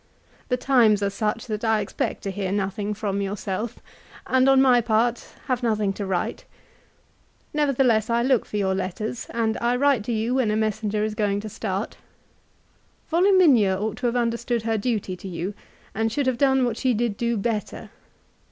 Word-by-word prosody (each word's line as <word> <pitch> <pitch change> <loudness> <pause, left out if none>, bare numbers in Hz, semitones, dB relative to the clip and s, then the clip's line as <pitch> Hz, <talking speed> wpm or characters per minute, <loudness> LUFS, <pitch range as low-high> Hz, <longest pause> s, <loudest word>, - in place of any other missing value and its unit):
The 250 - +1
times 235 -6 +3
are 200 - 0
such 215 +3 -2
that 215 -2 -4
I 220 -1 +2
expect 200 - -3
to 195 - -3
hear 190 -1 -3
nothing 205 +1 -2
from 200 -1 -2
yourself, 200 +3 -3 0.5
and 260 +1 +3
on 270 -1 +6
my 255 -2 +5
part 230 +1 0 0.2
have 255 -1 -1
nothing 215 -4 0
to 200 0 -5
write. 185 -2 -2 1.1
Nevertheless, 260 -7 +2
I 235 0 +2
look 255 -2 +3
for 210 - -4
your 190 -2 +1
letters, 190 +5 -4
and 225 -1 -1
I 240 +1 +1
write 275 -3 +2
to 240 - -2
you 225 +2 0
when 255 -4 +1
a 210 - +1
messenger 215 -1 -1
is 215 0 -1
going 205 -1 0
to 215 - -6
start. 200 0 -4 1.1
Voluminia 325 - +4
ought 215 +1 -3
to 250 - -1
have 235 - -1
understood 235 -1 -1
her 225 0 0
duty 210 -4 -2
to 185 - -10
you, 185 +2 -4 0.4
and 225 +1 0
should 280 +4 -1
have 255 -2 0
done 265 -2 +3
what 235 -2 -2
she 255 -2 +1
did 230 -1 -1
do 235 +1 -1
better. 215 0 -3
220 Hz, 180 wpm, -24 LUFS, 205-245 Hz, 1.1 s, on